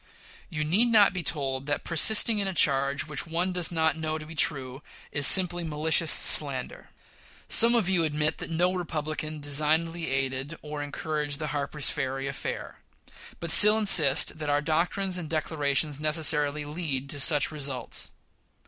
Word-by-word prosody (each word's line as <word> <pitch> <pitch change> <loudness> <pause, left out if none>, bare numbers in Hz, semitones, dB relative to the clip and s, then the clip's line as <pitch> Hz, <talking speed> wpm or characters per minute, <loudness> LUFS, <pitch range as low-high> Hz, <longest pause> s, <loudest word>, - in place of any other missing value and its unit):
You 155 -4 -4
need 190 +11 +1
not 215 -4 +3
be 180 - -5
told 140 -3 -5
that 145 - -4
persisting 215 +6 +2
in 200 - -2
a 190 - -6
charge 140 -1 0
which 150 +1 -5
one 175 +3 -3
does 180 -1 -1
not 160 -2 -1
know 155 -1 -4
to 155 - -10
be 160 - -12
true 135 -4 -2 0.3
is 145 -2 +6
simply 175 -2 +7
malicious 160 +1 -1
slander. 140 -4 +1 0.6
Some 235 +1 +6
of 225 -6 0
you 185 -3 0
admit 150 0 -3
that - - -7
no 175 +3 -1
Republican 155 -3 -6
designedly 160 +3 -2
aided 135 +3 -4
or 150 -1 -8
encouraged 145 0 -5
the 155 0 -6
Harper's 145 0 0
Ferry 135 +1 -5
affair, 140 0 -7 0.6
but 170 -1 -2
still 210 +5 +8
insist 160 -8 +2
that 150 -1 -5
our 145 0 0
doctrines 180 +5 -3
and 160 -3 -9
declarations 150 -2 -2
necessarily 150 -1 +1
lead 145 -3 -5
to 145 - -7
such 145 +2 0
results. 135 -5 -5
155 Hz, 160 wpm, -25 LUFS, 145-170 Hz, 0.6 s, still